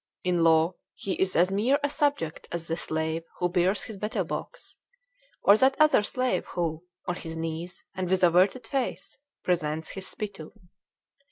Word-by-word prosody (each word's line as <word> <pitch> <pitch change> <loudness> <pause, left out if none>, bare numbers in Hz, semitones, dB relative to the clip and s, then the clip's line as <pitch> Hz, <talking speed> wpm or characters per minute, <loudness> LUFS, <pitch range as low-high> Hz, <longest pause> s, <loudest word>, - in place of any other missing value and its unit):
In 175 -2 +2
law, 165 +1 +4 0.2
he 195 - -3
is 190 0 +1
as 180 +3 +4
mere 230 +8 +3
a 285 - +2
subject 285 - -1
as 170 -1 -3
the 165 - -1
slave 160 0 -1 0.2
who 180 - +1
bears 185 +3 +2
his 220 - -7
betel 210 +2 -1
box; - - -7 0.6
or 200 - +8
that 265 +3 +4
other 305 -6 +6
slave 255 +4 0
who, 165 -2 -1 0.2
on 180 0 -2
his 165 -1 -6
knees, 165 +2 -5
and 185 -1 -3
with 185 0 +2
averted 185 +8 +4
face, 270 -1 -3 0.2
presents 160 -3 -1
his 195 -1 -6
spittoon. 195 -3 -7
180 Hz, 165 wpm, -27 LUFS, 165-210 Hz, 0.6 s, or